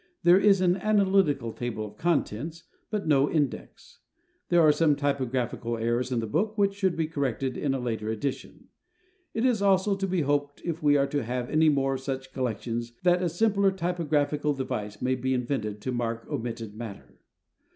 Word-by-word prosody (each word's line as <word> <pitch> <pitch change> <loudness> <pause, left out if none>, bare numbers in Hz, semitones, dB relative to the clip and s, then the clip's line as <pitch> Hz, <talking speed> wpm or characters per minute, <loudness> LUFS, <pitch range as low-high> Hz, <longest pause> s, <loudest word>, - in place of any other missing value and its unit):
There 175 +2 +7
is 195 -2 +4
an 180 0 +3
analytical 190 - +2
table 115 -3 -4
of 105 0 -11
contents, 160 +1 -1 0.3
but 210 -5 -3
no 140 -2 +4
index. 160 - -3 0.5
There 175 -1 +5
are 155 - +7
some 150 -1 +3
typographical 130 -4 -1
errors 120 +3 -1
in 120 -2 0
the - - -3
book 205 - -1
which 200 -1 +2
should 190 -3 0
be 160 - 0
corrected 135 -4 -2
in 135 -2 -1
a - - -2
later 110 -3 -3
edition. 120 +5 -5 0.7
It 225 +2 +1
is 240 -5 +2
also 195 0 +3
to 195 0 -2
be 185 -2 0
hoped 145 0 -1
if 170 -1 -3
we 145 -1 +4
are 140 - +3
to 145 +1 -1
have 125 +1 -3
any 155 +1 +4
more 135 -2 +1
of 130 - -4
such 135 -1 -5
collections, 120 -1 -3
that 180 0 +4
a 180 - +1
simpler 200 +2 +2
typographical 150 -5 0
device 110 -6 -4
may 130 +1 +2
be 130 +1 -1
invented 110 -5 -2
to 130 - -3
mark 115 -2 -2
omitted 115 -6 -4
matter. 110 -2 -9
140 Hz, 180 wpm, -27 LUFS, 120-175 Hz, 0.7 s, There